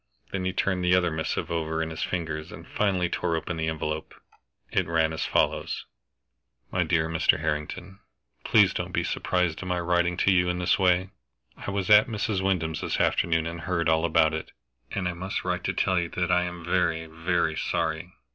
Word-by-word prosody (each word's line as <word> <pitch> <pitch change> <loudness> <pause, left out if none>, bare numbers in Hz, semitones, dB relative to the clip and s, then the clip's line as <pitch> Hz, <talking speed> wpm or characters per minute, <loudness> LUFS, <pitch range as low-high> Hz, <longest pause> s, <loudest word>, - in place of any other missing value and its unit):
Then 95 -1 -2
he 95 - +1
turned 95 -1 0
the 90 0 +4
other 90 -2 +2
missive 80 0 -2
over 80 -1 -1
in 80 - -5
his 80 - -6
fingers, 80 -3 -3
and - - -10
finally 95 -4 +1
tore 85 -1 -1
open 80 +1 -3
the 80 0 -1
envelope. 80 -1 -3 0.6
It 95 - +1
ran 80 -1 +1
as 80 - -2
follows: - - 0 0.9
"MY - - +1
DEAR 80 -1 +1
MR. 80 -2 +2
HARRINGTON, 80 +5 -4 0.4
Please - - +5
don't - - -4
be - - +1
surprised 90 -3 0
at 95 - -6
my 90 -1 0
writing 85 0 +1
to 95 - +3
you 90 -1 +3
in 90 - -1
this 90 +2 +2
way. 95 0 +3 0.4
I - - -7
was 100 +1 -1
at 105 0 +8
Mrs. 105 -3 -1
Wyndham's 90 -5 0
this - - -2
afternoon 85 -1 +2
and 85 0 -5
heard 85 -2 -1
all 80 0 +3
about 80 -1 +3
it, 80 - -5 0.4
and 95 -3 -2
I 90 - -2
must 95 +3 -4
write - - -1
to - - 0
tell 95 -1 +2
you 85 -1 -2
that 90 +1 -1
I 90 0 +3
am 85 -1 -7
very, 85 -2 +1
very 80 0 -1
sorry. 80 +1 -2
85 Hz, 200 wpm, -26 LUFS, 80-90 Hz, 0.9 s, at